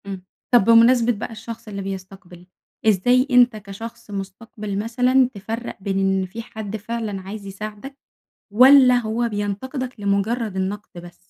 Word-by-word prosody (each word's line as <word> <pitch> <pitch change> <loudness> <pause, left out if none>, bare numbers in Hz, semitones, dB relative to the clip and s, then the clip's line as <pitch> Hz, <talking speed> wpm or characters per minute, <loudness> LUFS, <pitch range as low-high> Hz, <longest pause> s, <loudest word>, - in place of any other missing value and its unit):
إمم، 190 -2 -6 0.3
طَب 240 -5 +6
بمناسبة 230 +1 +5
بقى 225 +1 -5
الشخص 225 +1 -9
اللي 200 -2 -5
بيستقبل، 190 -2 -9 0.4
إزاي 245 +6 +3
أنت 245 -2 +5
كشخص 215 +2 -9
مُستقبِل 200 +1 -6
مثلًا 250 +3 +2
تفرّق 225 +4 -6
بين 195 0 -1
إن 195 -1 +1
في 195 +5 -7
حد 220 -2 -6
فعلًا 215 -2 -4
عايز 200 +2 -8
يساعدك، 210 +7 -8 0.6
والّا 255 +2 +7
هو 235 +1 -1
بينتقدك 230 +5 -4
لمجرد 200 +2 -1
النقد 195 +2 -3
بس؟ 175 0 -12
215 Hz, 140 wpm, -22 LUFS, 195-235 Hz, 0.6 s, والّا